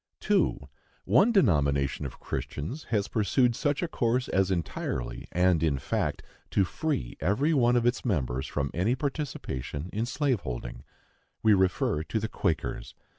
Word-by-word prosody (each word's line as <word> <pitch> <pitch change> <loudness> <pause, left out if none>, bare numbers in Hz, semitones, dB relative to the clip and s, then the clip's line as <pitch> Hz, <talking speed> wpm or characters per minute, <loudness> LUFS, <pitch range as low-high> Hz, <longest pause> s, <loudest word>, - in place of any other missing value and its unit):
2. - - +1 0.4
One 240 - +5
denomination 70 - +2
of - - -12
Christians 120 - -5
has 105 -3 0
pursued 115 +4 +2
such 145 +4 0
a - - 0
course 125 -4 0
as 95 0 +2
entirely, 65 -8 -3
and 90 -2 +3
in 80 -4 +2
fact, 65 - -2 0.3
to 100 - +3
free 120 - -3
every 105 - +2
one 120 -4 +4
of 120 -1 +2
its 120 +1 +1
members 65 - -1
from 70 -2 -2
any 100 +9 +1
participation 95 - -4
in 110 +3 -1
slave 135 -3 +1
holding. - - -6 0.6
We 110 -1 +6
refer 95 -5 +2
to 110 +7 -2
the 110 - -2
Quakers. 80 -6 -2
100 Hz, 150 wpm, -28 LUFS, 75-125 Hz, 0.6 s, We